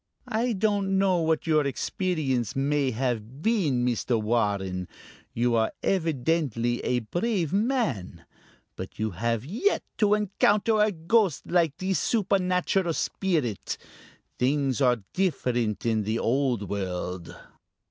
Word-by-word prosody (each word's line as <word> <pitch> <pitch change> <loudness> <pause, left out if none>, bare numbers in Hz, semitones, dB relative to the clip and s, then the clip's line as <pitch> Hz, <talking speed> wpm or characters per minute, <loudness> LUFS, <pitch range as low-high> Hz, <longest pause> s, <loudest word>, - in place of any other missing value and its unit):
"I 235 +2 +1
don't 200 -1 +1
know 190 -2 +3
what 160 -1 +1
your 155 -2 +3
experience 140 - -1
may 140 0 +1
have 125 +2 -3
been, 160 - +2
Mr. 120 -1 0
Warren. 100 -5 0 0.4
You 120 +1 +1
are 110 -1 +2
evidently 145 - 0
a 125 -1 0
brave 175 - -1
man, 195 - -1 0.5
but 95 - -8
you 110 0 -1
have 115 +5 -1
yet 235 - 0 0.2
to 210 -1 +4
encounter 210 +1 +2
a 210 0 +4
ghost 185 - +1
like 170 -5 +1
this 190 0 0
supernatural 185 -4 +1
spirit. 155 - -1 0.6
Things 135 +1 +1
are 125 -5 +3
different 125 - 0
in 110 -2 +2
the 110 +2 -1
Old 120 -4 0
World!" 90 -2 -4
140 Hz, 120 wpm, -26 LUFS, 115-190 Hz, 0.6 s, to